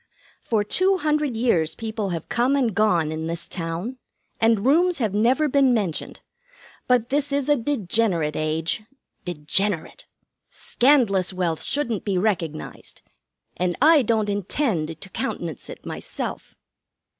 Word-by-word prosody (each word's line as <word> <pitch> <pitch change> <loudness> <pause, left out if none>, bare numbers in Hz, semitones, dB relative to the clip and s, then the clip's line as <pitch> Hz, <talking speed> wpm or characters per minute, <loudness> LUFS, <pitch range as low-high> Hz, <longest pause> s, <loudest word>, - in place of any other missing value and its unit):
'For 220 -3 0
two 375 - +2
hundred 300 -6 0
years 175 -10 +1
people 220 -2 -3
have 170 -2 -4
come 245 +4 +2
and 250 -6 +1
gone 180 -7 +2
in 160 +1 -4
this 170 0 -3
town, 175 +9 -4 0.4
and 225 -1 +3
rooms 340 +6 +4
have 220 -7 -1
never 250 +9 +3
been 270 -3 +4
mentioned. 190 -8 -3 0.7
But 245 -2 +2
this 285 +1 0
is 280 -1 0
a 295 - +6
degenerate 215 - 0
age. 155 +5 -1 0.4
Degenerate! 175 +2 -2 0.4
Scandalous 230 -9 +2
wealth 175 -3 -1
shouldn't 235 -8 -1
be 195 -3 -1
recognized, 175 -6 -3 0.5
and 180 -1 -1
I 310 +1 +6
don't 220 -3 +1
intend 200 - -1
to 195 - -10
countenance 175 - -4
it - - -10
myself!' - - -6
215 Hz, 135 wpm, -23 LUFS, 175-260 Hz, 0.7 s, a